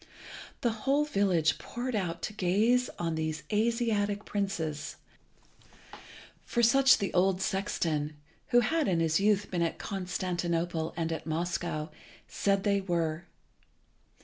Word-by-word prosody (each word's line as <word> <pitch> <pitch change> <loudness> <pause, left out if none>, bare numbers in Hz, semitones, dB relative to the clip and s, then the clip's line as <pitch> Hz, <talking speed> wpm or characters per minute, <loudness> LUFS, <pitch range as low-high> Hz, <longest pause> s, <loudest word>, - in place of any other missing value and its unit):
The 240 - +2
whole 275 +7 +1
village 190 - +2
poured 245 0 -4
out 175 -5 -2
to 215 - -3
gaze 215 +6 +2
on 165 -1 -1
these 155 -1 -3
Asiatic 210 -2 +1
princes, 170 -7 -3 1.5
for 235 - 0
such 265 +3 +6
the 200 - -3
old 185 +1 +3
sexton, 160 -6 -1 0.3
who 245 - +5
had 315 +6 +1
in 175 -3 +2
his 160 0 +2
youth 205 0 +2
been 175 -2 0
at 165 - 0
Constantinople 175 -3 -2
and 165 -1 -1
at 160 - -4
Moscow, 160 -1 -2 0.4
said 195 -1 0
they 200 -1 +2
were. 170 -3 -1
190 Hz, 125 wpm, -30 LUFS, 165-215 Hz, 1.5 s, such